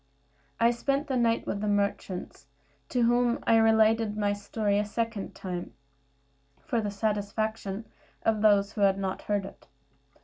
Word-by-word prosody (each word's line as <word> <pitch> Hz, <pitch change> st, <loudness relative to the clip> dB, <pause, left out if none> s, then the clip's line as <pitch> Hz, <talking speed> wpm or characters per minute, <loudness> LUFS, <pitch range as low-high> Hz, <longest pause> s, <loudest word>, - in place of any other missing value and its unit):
I 235 Hz, +1 st, +5 dB
spent 275 Hz, +4 st, -1 dB
the 265 Hz, -, -2 dB
night 235 Hz, -2 st, +2 dB
with 200 Hz, -, -3 dB
the 210 Hz, -, -1 dB
merchants, 200 Hz, -5 st, -2 dB, 0.4 s
to 245 Hz, -, +1 dB
whom 240 Hz, 0 st, +3 dB
I 225 Hz, -, +5 dB
related 220 Hz, -1 st, +3 dB
my 205 Hz, -1 st, +1 dB
story 205 Hz, 0 st, -1 dB
a -, -, +1 dB
second 225 Hz, 0 st, -3 dB
time, 180 Hz, -2 st, -6 dB, 0.8 s
for 235 Hz, -, -1 dB
the 210 Hz, -, -2 dB
satisfaction 210 Hz, 0 st, -2 dB, 0.4 s
of 220 Hz, -2 st, +1 dB
those 205 Hz, -2 st, +4 dB
who 215 Hz, -, -5 dB
had 195 Hz, -1 st, +4 dB
not 190 Hz, -1 st, -3 dB
heard 205 Hz, -2 st, -1 dB
it. -, -, -13 dB
210 Hz, 150 wpm, -28 LUFS, 200-230 Hz, 0.8 s, I